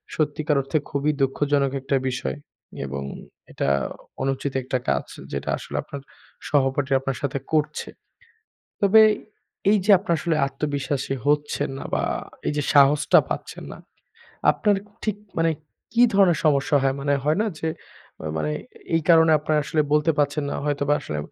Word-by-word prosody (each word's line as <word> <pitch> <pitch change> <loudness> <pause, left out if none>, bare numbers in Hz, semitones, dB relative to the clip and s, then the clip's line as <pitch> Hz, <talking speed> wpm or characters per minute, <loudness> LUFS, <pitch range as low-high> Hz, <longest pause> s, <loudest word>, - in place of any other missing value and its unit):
সত্যিকার 150 -1 0
অর্থে 135 +4 -1
খুবই 145 +2 0
দুঃখজনক 140 0 +1
একটা 135 0 +1
বিষয়। 125 +3 -3 0.5
এবং 70 0 -5 0.5
এটা - - -1 0.5
অনুচিত 135 +1 -1
একটা 130 0 -1
কাজ - - 0 0.3
যেটা 70 - -4
আসলে - - -9
আপনার 140 - -8 0.5
সহপাঠীরা 135 -1 +2
আপনার 135 -1 -3
সাথে 140 -1 -2
করছে। 155 -1 0 0.9
তবে 205 +2 +7 0.7
এইযে 205 0 +3
আপনারা 170 -2 0
আসলে 165 -2 0
আত্মবিশ্বাসী 140 -1 -2
হচ্ছেন 145 0 +1
না - - -7
বা - - +1 0.4
এই - - +1
যে 145 - 0
সাহসটা 145 +1 +6
পাচ্ছেন - - -5
না। - - -11 0.7
আপনার 210 -2 +1 0.3
ঠিক 215 -2 0 0.2
মানে 165 0 +3 0.4
কি 235 - +3
ধরনের 195 -4 +4
সমস্যা 145 -1 +3
হয়? 135 0 +2
মানে 140 0 +1
হয় 150 +4 +2
না 220 - 0
যে 160 - -2 0.7
মানে 75 -1 -1 0.4
এই 165 - +2
কারণে 160 -1 +6
আপনারা 150 +1 +1
আসলে 155 +1 +1
বলতে 150 +2 +3
পারছেন 145 +1 +1
না। - - -3
হয়তোবা 145 0 +1
আসলে 75 - -5
145 Hz, 145 wpm, -24 LUFS, 135-155 Hz, 0.9 s, তবে